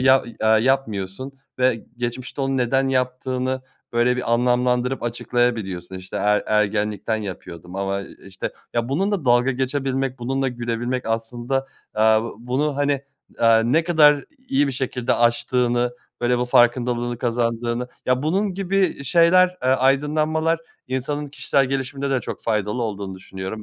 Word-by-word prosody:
ya, 130 +1 +5
i 120 - -11
eee, - - +2
yapmıyorsun 110 0 +1 0.3
ve 125 -3 +1
geçmişte 120 +2 -4
onu 135 0 0
neden 135 +2 +2
yaptığını, 130 0 -1 0.3
böyle, 120 +1 +2
bir 125 -2 -1
anlamlandırıp 125 +1 +1
açıklayabiliyorsun. 115 -6 -1
İşte, 95 0 -7
"Er 105 0 +2
ergenlikten 105 0 0
yapıyordum 90 -3 -7
ama, 100 0 -1
eee, 100 - -11
işte" 95 -1 -5 0.2
Ya, 120 0 0
bununla 190 +3 0
dalga 120 +1 +4
geçebilmek, 135 0 -1
bununla 135 +2 -1
gülebilmek 120 +1 -3
aslında, 120 +4 -2 0.3
aaa, 110 0 +4 0.2
bunu, 135 +5 -1
hani, 145 -1 +1 0.4
aaa, 115 -1 +5
ne 150 +8 +2
kadar 150 -4 +5 0.2
iyi 140 +2 +3
bir 135 - -2
şekilde 125 -1 -1
aştığını, 120 +1 +1 0.3
böyle, 120 0 +2
bu 125 - +1
farkındalığını 120 0 +2
kazandığını 120 0 -1 0.2
Ya, 130 +1 +2
bunun 190 +5 0
gibi 195 0 -1
i 180 -7 0
şeyler, 170 +5 +5
eee, 130 - +1
aydınlanmalar 150 +5 +2 0.3
insanın 140 +3 -2
kişisel 140 -1 +1
gelişiminde 135 +1 -2
de 135 -2 +1
çok - - -7
faydalı 105 +1 -1
olduğunu 100 -4 -4
düşünüyorum. 95 +3 -7
125 Hz, 140 wpm, -22 LUFS, 115-135 Hz, 0.4 s, ya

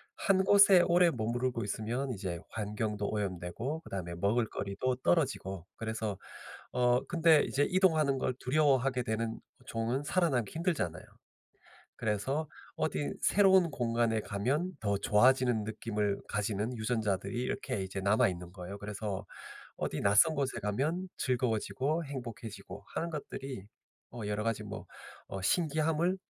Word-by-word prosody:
1 190 -2 +2
곳에 200 -2 +7
오래 175 0 +5
머무르고 120 +1 -1
있으면 115 +6 -2
이제 95 -5 -4
환경도 105 -1 -2
오염되고 100 - -3
그다음에 90 - -5
먹을거리도 110 +4 0
떨어지고 130 - 0
그래서 110 -3 -3 0.6
어 125 0 +3
근데 165 -3 +4
이제 145 +2 +1
이동하는 160 -7 +3
걸 130 - 0
두려워하게 135 -2 +2
되는 115 0 -2 0.3
종은 115 +4 -1
살아남기 145 - +1
힘들잖아요. 160 - -1 1.0
그래서 130 +9 -1 0.3
어디 75 -2 -1
새로운 190 -4 +5
공간에 115 -2 +1
가면 130 - -1
더 100 -2 +1
좋아지는 125 +1 +4
느낌을 105 -2 -2
가지는 105 +3 -2
유전자들이 110 0 -1
이렇게 115 -5 -2
이제 95 +1 -4
남아있는 95 -3 +1
거예요. 90 +1 -8
그래서 105 -1 -4 0.5
어디 - - -3
낯선 105 +11 +5
곳에 140 -4 -1
가면 150 - -1
즐거워지고 130 +5 0
행복해지고 120 -5 -7
하는 170 +1 -2
것들이 135 -7 -6 0.5
어 120 - -7
여러 105 +1 -1
가지 115 0 -1
뭐 - - -7 0.4
어 95 - -6
신기함을 160 - +1
120 Hz, 325 characters per minute, -31 LUFS, 105-145 Hz, 1.0 s, 곳에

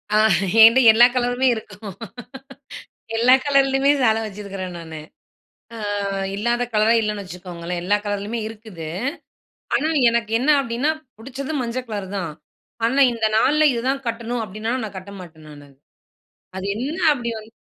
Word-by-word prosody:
அ - - +5 0.5
என்ட்ட 230 +3 +8
எல்லா 235 +2 +7
கலருமே 245 +1 +1
இருக்கும். 205 -2 -9 1.2
எல்லா 245 +3 +5
கலர்லேயுமே 275 -1 +3
சேலை 225 -2 +3
வச்சிருக்கிறேன் 195 -3 -7
நானு. 160 -2 -8 0.8
அ - - -8 0.6
இல்லாத 235 +3 0
கலரே 220 +2 +3
இல்லைன்னு 210 -2 -3
வச்சுக்கோங்களேன், 175 -1 -6
எல்லா 205 +2 +3
கலர்லேயுமே 205 +3 -3
இருக்குது. 210 -7 -10 0.9
ஆனா 305 +3 +1 0.2
எனக்கு 230 -2 -1
என்ன 270 +5 +1
அப்படீன்னா, 250 +4 -1 0.3
புடிச்சது 270 +5 -6
மஞ்ச 235 +1 -3
கலர் 205 -3 -5
தான். 165 -4 -4 0.5
ஆனா, 260 +4 +2
"இந்த 225 -2 0
நாள்ல 305 +7 +3
இதுதான் 260 +3 -2
கட்டணும்." 230 0 -3
அப்படீன்னா, 215 +3 -5
நான் 205 - -7
கட்ட 190 +2 -9
மாட்டேன் 160 -3 -13
நானு. 145 -1 -13 0.9
அது 190 - -5
என்ன 285 +9 -4
அப்படி 240 -4 -3
வந்து 220 +1 -14
225 Hz, 135 wpm, -21 LUFS, 200-245 Hz, 1.2 s, என்ட்ட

